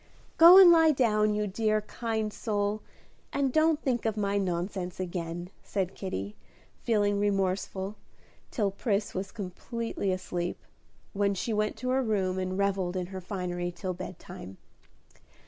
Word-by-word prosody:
"Go 340 +3 +11
and 375 -3 +10
lie 325 -1 +6
down, 215 -7 +2
you 210 0 0
dear, 215 +2 0
kind 220 -1 -3
soul, 205 -1 -1 0.5
and 275 -2 0
don't 315 -1 +3
think 250 -3 0
of 220 -1 -1
my 200 -1 0
nonsense 180 0 -3
again," 175 -1 -4
said 190 -2 -2
Kitty, 100 - -5 0.5
feeling 205 -3 +1
remorseful, 195 0 -1 0.5
till 205 -5 0
Pris 205 0 -1
was 190 +1 -4
comfortably 205 +1 -4
asleep, 180 -1 -3 0.6
when 200 0 +1
she 220 +4 -2
went 215 +1 0
to 255 +3 -3
her 260 +1 +2
room 195 -6 0
and 185 0 -2
revelled 195 -2 0
in 180 - -2
her 190 - -5
finery 175 -2 -3
till 180 +1 -4
bedtime. 175 - -9
200 Hz, 145 wpm, -29 LUFS, 185-220 Hz, 0.6 s, Go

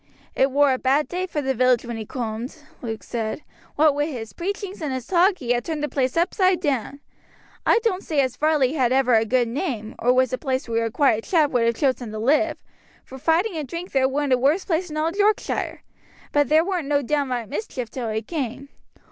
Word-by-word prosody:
"It 265 - +3
war 280 0 +4
a 255 - -2
bad 275 +3 +2
day 365 +1 -2
for 300 -5 -3
the 265 0 0
village 255 -1 +2
when 235 0 -5
he 220 -2 -6
coomed," 235 +3 -5 0.2
Luke 225 -2 -5
said; 230 +4 -4 0.3
"what 305 0 +4
wi' 290 +1 0
his 225 -9 -6
preachings 395 +1 -5
and 300 -3 -2
his 260 -2 -4
talk, 370 +2 +3
he 245 -5 0
ha' 240 - 0
turned 305 +3 -4
the - - +1
place 260 0 -1
upside 370 +1 +2
down. 280 - -2 0.7
I - - +6
doan't 390 -5 0
say 305 -3 -1
as 260 -2 -1
Varley 295 -2 +2
had 255 -6 +1
ever 260 -1 +3
a 225 0 +4
good 245 +1 +2
name, 235 - -3
or 245 - +3
was 255 0 +2
a 255 - -1
place 260 -1 -2
where 230 0 0
a - - -1
quiet 225 -5 +2
chap 315 -5 +2
would 240 -2 +2
have 230 0 +2
chosen 255 -4 0
to - - -4
live, 290 +8 +2 0.5
For 265 - -10
fighting 335 - +1
and 305 -3 -4
drink 345 +6 -6
there 265 -1 +2
weren't 280 0 0
a 250 - +3
worse 295 +9 +2
place 350 +1 -1
in 305 - -5
all 315 +2 +1
Yorkshire, 415 +3 0 0.5
but 290 -1 +2
there 315 +2 +4
weren't 360 -6 -2
no 285 -1 +1
downright 260 -4 -1
mischief 265 - -5
till 245 -4 -4
he 220 +1 -2
came. 275 -1 -4
275 Hz, 225 wpm, -23 LUFS, 245-315 Hz, 0.7 s, I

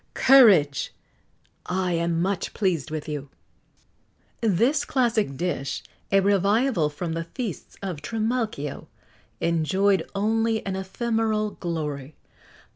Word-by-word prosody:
Courage! 200 - +5 0.7
I 185 0 0
am 170 0 0
much 195 0 -2
pleased 170 -7 0
with 155 0 -5
you." 145 -2 -5 1.1
This 235 - +2
classic 230 - 0
dish 140 -5 -2 0.3
a 195 0 +5
revival 200 - +2
from 160 +3 -4
the 165 0 -3
feasts 220 0 -6
of 185 -5 -3
Trimalcio 220 - -2 0.5
enjoyed 185 +4 +1
only 225 +2 +1
an 195 -1 -2
ephemeral 215 +2 -1
glory. 150 -6 -4
190 Hz, 105 wpm, -25 LUFS, 160-220 Hz, 1.1 s, Courage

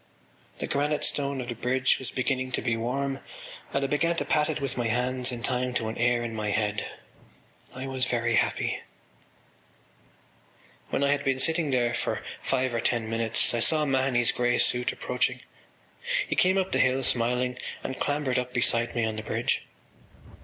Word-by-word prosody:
The - - -3
granite 145 +1 0
stone 140 -2 +1
of 120 - -6
the - - -1
bridge 125 +3 +1
was 130 - -6
beginning 130 0 -1
to - - +1
be 120 -2 +1
warm 135 +4 -2 0.5
and 140 - 0
I - - +2
began 165 +4 +1
to - - -1
pat 150 0 +2
it 155 - -1
with 135 -3 -2
my 120 -2 0
hands 125 +2 0
in 120 -1 -6
time 125 0 0
to 110 -2 0
an 110 - -6
air 120 0 +2
in 115 -1 -4
my 105 -1 -2
head. 105 -1 0 0.9
I 130 +1 -5
was 130 -1 -1
very 120 -1 0
happy. - - +1 2.1
When - - 0
I 140 - +3
had 145 0 +1
been 135 -2 +1
sitting 160 +3 +2
there 120 -2 +2
for - - -2 0.2
five 130 -1 0
or 115 - 0
ten 115 -2 0
minutes 115 -1 +1
I 120 - 0
saw 155 +6 +3
Mahony’s 130 -3 +2
grey 120 0 +1
suit 125 0 +2
approaching. - - -1 0.9
He - - -1
came 185 +1 +4
up 190 -1 0
the - - +1
hill, 130 +1 +3
smiling, 125 +1 +1 0.2
and 130 - -4
clambered 145 -3 0
up 125 0 -5
beside 120 0 +2
me 115 -1 +1
on 110 -1 -3
the - - -3
bridge. 110 - -1
125 Hz, 185 wpm, -27 LUFS, 120-135 Hz, 2.1 s, came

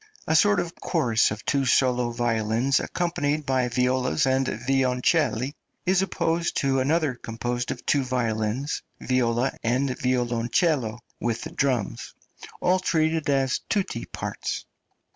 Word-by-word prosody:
A 160 - +1
sort 205 +4 +5
of 175 -1 -3
chorus 125 -10 +2
of 105 +1 -6
two 140 -1 +1
solo 125 -1 +2
violins, 115 +2 +1
accompanied 155 -4 -1
by 130 -2 +1
violas 125 +3 +1
and 130 0 +2
violoncelli, 130 +2 +1 0.3
is 185 +1 +3
opposed 170 -3 0
to 135 -1 +2
another, 150 +1 +1
composed 120 +1 -4
of 125 - -5
two 140 -2 +2
violins, 125 +1 -1 0.2
viola, 125 0 +1
and 125 +3 0
violoncello, 120 - +1 0.2
with 115 -1 -2
the - - -6
drums, 130 -7 -1 0.5
all 185 +1 +3
treated 160 -3 +1
as 135 -2 +2
tutti 190 - -1
parts. - - -4
130 Hz, 125 wpm, -25 LUFS, 120-150 Hz, 0.5 s, sort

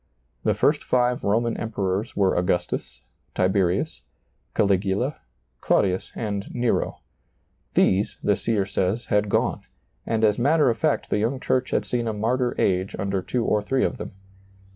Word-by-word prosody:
The - - +2
first - - +2
five 125 -1 +1
Roman 115 +3 +1
Emperors 100 -2 -2
were 95 -2 +2
Augustus, 90 -8 -1 0.3
Tiberius, 95 - +1 0.5
Caligula, 100 +7 +1 0.4
Claudius, 95 -1 +1
and 100 -3 -3
Nero: 120 -1 -1 0.7
these, 100 +2 +2
the 105 - +3
seer 105 -1 0
says, 100 +4 -1
had 105 0 +1
gone; - - +1 0.5
and 110 -1 0
as 105 0 +3
matter 145 +1 +4
of 115 - -4
fact 155 -2 0
the - - +2
young 120 +5 0
church 130 0 0
had - - 0
seen 120 -1 -1
a 110 - -1
martyr 120 +4 0
age 95 +1 +1
under 100 -1 -1
two 120 +4 -2
or 105 - +2
three 130 +5 0
of - - -1
them. - - -7
105 Hz, 150 wpm, -24 LUFS, 95-120 Hz, 0.7 s, matter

